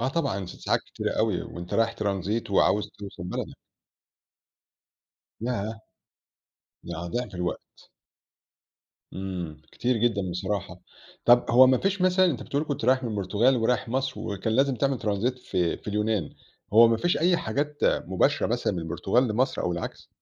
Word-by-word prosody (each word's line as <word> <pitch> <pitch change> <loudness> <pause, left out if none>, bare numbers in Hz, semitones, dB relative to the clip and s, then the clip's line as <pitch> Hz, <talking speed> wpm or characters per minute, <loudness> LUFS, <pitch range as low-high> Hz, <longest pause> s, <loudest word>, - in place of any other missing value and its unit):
آه 125 - +1
طبعًا، 135 - -1
س - - -9
ساعات - - 0
كتيرة - - -4
أوي، - - +1
وأنت 85 0 -7
رايح 115 0 +2
Transit 100 +2 -1
وعاوز 105 +1 +3
توصل 100 -3 -8
بلدك. 90 - -4 1.9
ياه! 110 -2 -3 1.0
يعني 85 0 -5
ضعف 120 +4 -3
الوقت. 90 0 -5 1.2
امم، 90 -5 -5
كتير 125 +1 0
جدًا 105 -5 0
بصراحة، 90 0 -3 0.4
طب 120 0 +6
هو 125 +2 +8
ما 130 0 +4
فيش 195 0 0
مثلًا 185 +1 +4
أنت 150 -8 -1
بتقول 145 +2 -2
كنت 145 -6 -3
رايح 130 +1 +3
من 115 - -2
البرتغال 105 +5 +2
ورايح 115 +1 0
مصر، 135 +2 -2
وكان 105 +2 -3
لازم 135 +3 +3
تعمل 135 0 0
Transit 110 +5 -1
في 90 -8 -1
في - - -11
اليونان، 105 -4 -1 0.4
هو 115 +2 +8
ما 115 - +3
فيش 175 +9 +1
أي 175 +2 +3
حاجات 145 +4 -2
مُباشرة - - +2
مثلًا - - 0
من 90 - -3
البرتغال 90 +9 +1
لمصر 120 +5 0
أو 90 - 0
العكس؟ 85 - -6
110 Hz, 155 wpm, -26 LUFS, 95-130 Hz, 1.9 s, هو